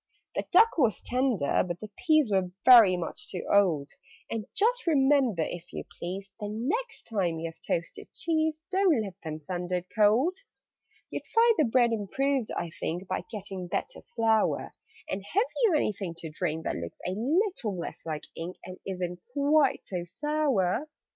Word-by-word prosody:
"The -, -, -2 dB
duck 450 Hz, -6 st, +5 dB
was 235 Hz, -7 st, +3 dB
tender, 250 Hz, -, +1 dB
but 175 Hz, -1 st, -5 dB
the 215 Hz, -1 st, -9 dB
peas 310 Hz, -, +3 dB
Were 190 Hz, -2 st, +2 dB, 0.2 s
very 225 Hz, -8 st, +9 dB
much 170 Hz, -2 st, -6 dB
too 180 Hz, -, -5 dB
old: 170 Hz, -8 st, +3 dB, 0.4 s
And 225 Hz, -2 st, -3 dB
just 475 Hz, +1 st, +1 dB
remember, 270 Hz, -, +3 dB
if 175 Hz, 0 st, -7 dB
you -, -, -5 dB, 0.2 s
please, 190 Hz, +3 st, -5 dB
The 205 Hz, -1 st, -4 dB
next 330 Hz, -, -2 dB
time 185 Hz, -7 st, -1 dB
you 165 Hz, -, -4 dB
have 165 Hz, -, -27 dB
toasted 165 Hz, 0 st, -3 dB
cheese, 315 Hz, -1 st, -1 dB
Don't 375 Hz, -7 st, +3 dB
let 195 Hz, -3 st, -6 dB
them 155 Hz, -2 st, -4 dB
send 175 Hz, +3 st, -5 dB
it 180 Hz, -1 st, -1 dB
cold. 230 Hz, -, +4 dB, 0.7 s
"You'd -, -, -5 dB
find 460 Hz, +1 st, +5 dB
the 310 Hz, -, +5 dB
bread 240 Hz, 0 st, +3 dB
improved, 255 Hz, +4 st, 0 dB
I 170 Hz, -, -3 dB
think, 175 Hz, +2 st, -4 dB
By 185 Hz, -, -3 dB
getting 195 Hz, -4 st, -5 dB
better -, -, -3 dB
flour: 225 Hz, -2 st, +2 dB, 0.3 s
And 195 Hz, +1 st, -3 dB
have 400 Hz, -, +1 dB, 0.2 s
you 380 Hz, -8 st, +4 dB
anything 195 Hz, -, -1 dB
to 165 Hz, -2 st, -7 dB
drink 160 Hz, -1 st, -2 dB
That -, -, -2 dB
looks 85 Hz, 0 st, -7 dB
a 180 Hz, -, -1 dB
little 255 Hz, -, 0 dB
less 170 Hz, -, -6 dB
like 155 Hz, -2 st, -4 dB
ink, 170 Hz, +2 st, -6 dB
And 185 Hz, 0 st, -9 dB
isn't 180 Hz, -2 st, -4 dB
quite 285 Hz, 0 st, +3 dB
so 180 Hz, -3 st, -4 dB
sour?" 275 Hz, -, 0 dB
210 Hz, 170 wpm, -28 LUFS, 180-290 Hz, 0.7 s, very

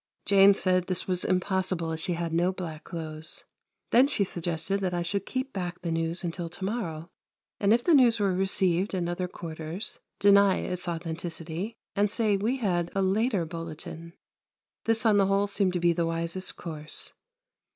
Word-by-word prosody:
Jane 200 Hz, 0 st, +7 dB
said 185 Hz, -2 st, +2 dB
this 185 Hz, -1 st, -2 dB
was 180 Hz, -1 st, 0 dB
impossible 185 Hz, -2 st, 0 dB
as 160 Hz, -, -3 dB
she 180 Hz, +1 st, -1 dB
had 170 Hz, -1 st, -3 dB
no 175 Hz, +2 st, +3 dB
black 165 Hz, -5 st, -6 dB
clothes. 160 Hz, -2 st, -5 dB, 0.5 s
Then 255 Hz, +3 st, +6 dB
she 270 Hz, -8 st, +2 dB
suggested 175 Hz, +1 st, -2 dB
that 180 Hz, -2 st, -1 dB
I 175 Hz, -, 0 dB
should 195 Hz, +3 st, -2 dB
keep 260 Hz, +1 st, -3 dB
back 180 Hz, -2 st, -4 dB
the 170 Hz, -, -1 dB
news 165 Hz, +2 st, -1 dB
until 170 Hz, 0 st, -3 dB
to 185 Hz, +3 st, -6 dB
morrow, 175 Hz, -6 st, -4 dB, 0.5 s
and 200 Hz, 0 st, +3 dB
if 240 Hz, +2 st, +4 dB
the 345 Hz, -, +4 dB
news 240 Hz, -5 st, +5 dB
were 200 Hz, -2 st, +2 dB
received 190 Hz, 0 st, +1 dB
in 175 Hz, -2 st, -1 dB
other 175 Hz, +1 st, -2 dB
quarters, 165 Hz, +2 st, -6 dB, 0.2 s
deny 200 Hz, -1 st, +6 dB
its 180 Hz, 0 st, -4 dB
authenticity, 170 Hz, +3 st, -4 dB, 0.2 s
and 205 Hz, +1 st, +3 dB
say 215 Hz, -1 st, +1 dB
we 220 Hz, +7 st, 0 dB
had 175 Hz, -7 st, 0 dB
a 195 Hz, -, +2 dB
later 200 Hz, -1 st, +1 dB
bulletin. 165 Hz, 0 st, -7 dB, 0.7 s
This 225 Hz, 0 st, +1 dB
on 215 Hz, -2 st, +5 dB
the 195 Hz, -1 st, +4 dB
whole 195 Hz, +1 st, +3 dB
seemed 200 Hz, -2 st, 0 dB
to 180 Hz, -, 0 dB
be 170 Hz, 0 st, +3 dB
the 170 Hz, 0 st, 0 dB
wisest 170 Hz, +3 st, -1 dB
course. 155 Hz, -3 st, -5 dB
180 Hz, 180 wpm, -28 LUFS, 170-200 Hz, 0.7 s, Jane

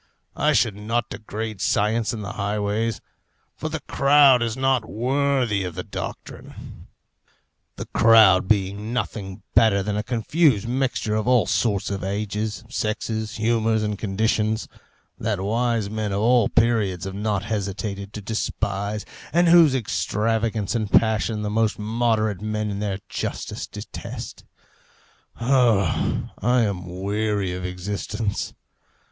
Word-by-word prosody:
I 150 Hz, +1 st, +2 dB
should 110 Hz, -5 st, +2 dB
not 115 Hz, +4 st, -2 dB
degrade 110 Hz, -1 st, -5 dB
science 110 Hz, +2 st, +1 dB
in 110 Hz, -3 st, -5 dB
the 100 Hz, -, -5 dB
highways, 105 Hz, +2 st, -1 dB, 0.5 s
for 155 Hz, -, -4 dB
the 160 Hz, -1 st, -4 dB
crowd 140 Hz, -2 st, +5 dB
is 115 Hz, 0 st, -1 dB
not 130 Hz, -4 st, +1 dB
worthy 125 Hz, -3 st, +1 dB
of 90 Hz, -3 st, -5 dB
the 90 Hz, -, -4 dB
doctrine, -, -, -8 dB, 0.9 s
the -, -, -6 dB
crowd 110 Hz, -5 st, +5 dB
being 100 Hz, +2 st, 0 dB
nothing 100 Hz, -5 st, -4 dB
better 110 Hz, -4 st, +4 dB
than 105 Hz, +1 st, -2 dB
a 105 Hz, -, 0 dB
confused 120 Hz, -, +1 dB
mixture 125 Hz, -3 st, -1 dB
of 110 Hz, +1 st, -1 dB
all 125 Hz, -3 st, +4 dB
sorts 100 Hz, -4 st, 0 dB
of 100 Hz, -1 st, -3 dB
ages, 105 Hz, +1 st, -3 dB
sexes, 110 Hz, -1 st, -3 dB
humours, 110 Hz, 0 st, +1 dB
and 105 Hz, -1 st, -2 dB
conditions, 110 Hz, +1 st, 0 dB, 0.5 s
that 105 Hz, -2 st, -1 dB
wise 115 Hz, +2 st, 0 dB
men 110 Hz, 0 st, -3 dB
of 100 Hz, -, -1 dB
all 120 Hz, 0 st, +4 dB
periods 110 Hz, -7 st, +1 dB
have 95 Hz, -, -5 dB
not 100 Hz, -1 st, -1 dB
hesitated 100 Hz, -1 st, -4 dB
to 105 Hz, -, -6 dB
despise, 100 Hz, -1 st, -2 dB, 0.3 s
and 175 Hz, +2 st, +4 dB
whose 165 Hz, -5 st, +7 dB
extravagance 110 Hz, -2 st, -1 dB
and 110 Hz, -3 st, -1 dB
passion 110 Hz, -1 st, +2 dB
the 105 Hz, -, -2 dB
most 110 Hz, 0 st, +1 dB
moderate 110 Hz, -2 st, 0 dB
men 105 Hz, 0 st, -2 dB
in 100 Hz, -, -4 dB
their 100 Hz, -2 st, -2 dB
justice -, -, -4 dB
detest. -, -, -8 dB, 0.9 s
Oh, 120 Hz, -5 st, +2 dB
I 125 Hz, +3 st, +3 dB
am 95 Hz, -5 st, -2 dB
weary 100 Hz, +1 st, -1 dB
of 90 Hz, 0 st, -5 dB
existence! 100 Hz, +3 st, -3 dB
110 Hz, 135 wpm, -23 LUFS, 100-115 Hz, 0.9 s, whose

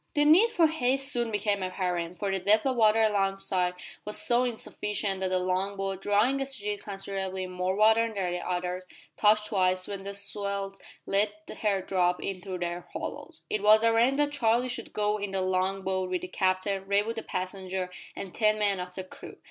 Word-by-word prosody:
The 295 Hz, 0 st, +4 dB
need 355 Hz, +10 st, +7 dB
for 340 Hz, -6 st, +3 dB
haste 275 Hz, -3 st, +1 dB
soon 240 Hz, -3 st, +1 dB
became 205 Hz, -1 st, 0 dB
apparent, 180 Hz, -2 st, -2 dB
for 200 Hz, -2 st, -2 dB
the 195 Hz, -, 0 dB
depth 210 Hz, +5 st, +3 dB
of 265 Hz, -1 st, +1 dB
water 225 Hz, -1 st, +4 dB
alongside 195 Hz, -3 st, +1 dB, 0.3 s
was 210 Hz, -, -3 dB
so 245 Hz, +1 st, +2 dB
insufficient 210 Hz, -4 st, -2 dB
that 190 Hz, -1 st, -1 dB
the 185 Hz, -, +2 dB
long 185 Hz, +2 st, -1 dB
boat 195 Hz, -1 st, -3 dB
drawing 215 Hz, +8 st, +2 dB
as 270 Hz, 0 st, -1 dB
she 210 Hz, -, -9 dB
did 205 Hz, 0 st, -3 dB
considerably 195 Hz, -1 st, -4 dB
more 180 Hz, +1 st, -2 dB
water 220 Hz, +2 st, +4 dB
than 190 Hz, -4 st, -2 dB
the 180 Hz, -, -2 dB
others 180 Hz, +1 st, -3 dB, 0.3 s
touched 210 Hz, 0 st, +4 dB
twice 185 Hz, -3 st, +1 dB
when 200 Hz, -1 st, -5 dB
the 200 Hz, 0 st, -5 dB
swells 200 Hz, -1 st, -4 dB, 0.2 s
let 200 Hz, +2 st, +2 dB, 0.3 s
her 200 Hz, -3 st, +1 dB
drop 180 Hz, -2 st, +1 dB
into 190 Hz, -1 st, -5 dB
their 175 Hz, 0 st, -4 dB
hollows. 330 Hz, -2 st, -6 dB
It 215 Hz, -, -1 dB
was 215 Hz, +1 st, +6 dB
arranged 230 Hz, +4 st, +4 dB
that 290 Hz, 0 st, +2 dB
Charlie 245 Hz, -2 st, +2 dB
should 245 Hz, -, -5 dB
go 210 Hz, 0 st, 0 dB
in 205 Hz, 0 st, -3 dB
the 195 Hz, 0 st, -1 dB
long 185 Hz, +1 st, 0 dB
boat 190 Hz, -1 st, -1 dB
with 180 Hz, -1 st, -1 dB
the -, -, -5 dB
captain, 190 Hz, +1 st, 0 dB
Raywood 205 Hz, +3 st, +1 dB
the -, -, -2 dB
passenger, 185 Hz, -1 st, -4 dB, 0.2 s
and 190 Hz, -, -7 dB
ten 215 Hz, -1 st, +2 dB
men 200 Hz, -2 st, +1 dB
of 180 Hz, 0 st, -6 dB
the 190 Hz, -, -4 dB
crew. 185 Hz, -, -12 dB
200 Hz, 195 wpm, -28 LUFS, 185-220 Hz, 0.3 s, need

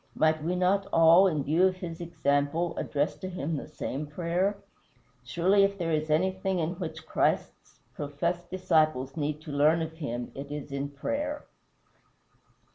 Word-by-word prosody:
Might 155 Hz, -1 st, +2 dB
we 175 Hz, +3 st, 0 dB
not 190 Hz, +2 st, +2 dB
all, 165 Hz, +4 st, +7 dB
in 155 Hz, -6 st, 0 dB
view 165 Hz, +7 st, +4 dB
of 185 Hz, -, -1 dB
his 175 Hz, -2 st, -7 dB
example, 160 Hz, 0 st, 0 dB
address 145 Hz, +1 st, -1 dB
to 185 Hz, -, -6 dB
him 165 Hz, -3 st, -3 dB
the 145 Hz, -, -5 dB
same 150 Hz, -1 st, -5 dB
prayer? 175 Hz, +6 st, -1 dB, 0.7 s
Surely 175 Hz, +10 st, +3 dB
if 200 Hz, 0 st, +1 dB
there 170 Hz, -3 st, -2 dB
is 155 Hz, 0 st, 0 dB
anything 190 Hz, +4 st, +1 dB
in 165 Hz, -1 st, 0 dB
which 160 Hz, -3 st, -6 dB
Christ's -, -, -1 dB
professed 170 Hz, +5 st, -3 dB
disciples 155 Hz, -7 st, +1 dB
need 150 Hz, 0 st, -2 dB
to 155 Hz, -, -8 dB
learn 155 Hz, +3 st, +3 dB
of 160 Hz, -, -5 dB
him 120 Hz, -5 st, -4 dB
it 140 Hz, +1 st, -8 dB
is 145 Hz, -1 st, -6 dB
in 140 Hz, +1 st, -3 dB
prayer. 285 Hz, -, -3 dB
160 Hz, 160 wpm, -28 LUFS, 145-180 Hz, 0.7 s, all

